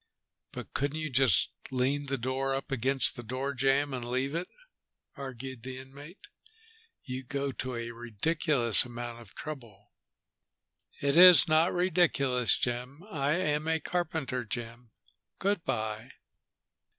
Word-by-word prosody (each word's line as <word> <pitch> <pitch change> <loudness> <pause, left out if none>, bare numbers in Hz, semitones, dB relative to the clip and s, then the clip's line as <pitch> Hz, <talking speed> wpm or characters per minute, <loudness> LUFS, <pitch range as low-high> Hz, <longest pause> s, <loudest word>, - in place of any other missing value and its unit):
"But - - -8
couldn't 145 +2 -1
you 155 -2 -4
just 130 -6 +3 0.2
lean 135 +3 0
the 135 0 -1
door 130 +2 -1
up 135 - -5
against 135 +1 0
the 120 - -6
door 130 +4 -3
jamb 135 +2 +1
and 125 -2 -4
leave 130 +4 -2
it?" 170 +2 -2 0.7
argued 130 -2 -7
the 130 +1 -7
inmate. 140 - -12 0.8
"You 130 +1 -5
go 140 +2 -3
to 130 -1 -5
a 115 0 -4
ridiculous 120 +2 +1
amount 120 -1 -7
of 110 - -17
trouble." 115 -10 -9 1.1
"It 140 0 +2
is 180 0 +10
not 160 +2 +4
ridiculous, 155 -9 +2
Jim. 125 +6 -3
I 145 -3 0
am 155 -3 0
a 160 0 +1
carpenter, 155 -7 -2
Jim. 120 +1 -7 0.5
Good 200 -3 0
by." 110 0 -3
135 Hz, 135 wpm, -30 LUFS, 120-150 Hz, 1.1 s, is